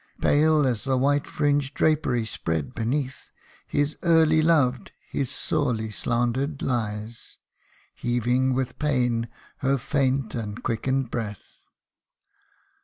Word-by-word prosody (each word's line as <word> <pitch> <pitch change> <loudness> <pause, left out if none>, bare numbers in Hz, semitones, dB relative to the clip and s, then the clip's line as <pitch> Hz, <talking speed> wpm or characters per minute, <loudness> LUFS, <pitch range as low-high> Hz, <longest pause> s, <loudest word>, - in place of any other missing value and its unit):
Pale 155 0 +4
as 120 -5 0
the 135 -1 +1
white 145 +2 +2
fringed 145 -1 0
drapery 145 -7 +2
spread 80 -9 -3
beneath, 130 +4 -2 0.4
His 145 +1 0
early 160 -2 +4
loved, 145 -6 +2
his 135 -3 -2
sorely 110 -2 -1
slandered, 120 +7 -1
lies, 110 -2 -3 0.6
Heaving 125 +2 +1
with 130 -1 -2
pain 125 -6 +1 0.3
her 135 +1 +1
faint 135 -1 0
and 110 -2 -5
quickened 130 +2 -1
breath. 105 -4 -6
130 Hz, 110 wpm, -25 LUFS, 115-145 Hz, 0.6 s, Pale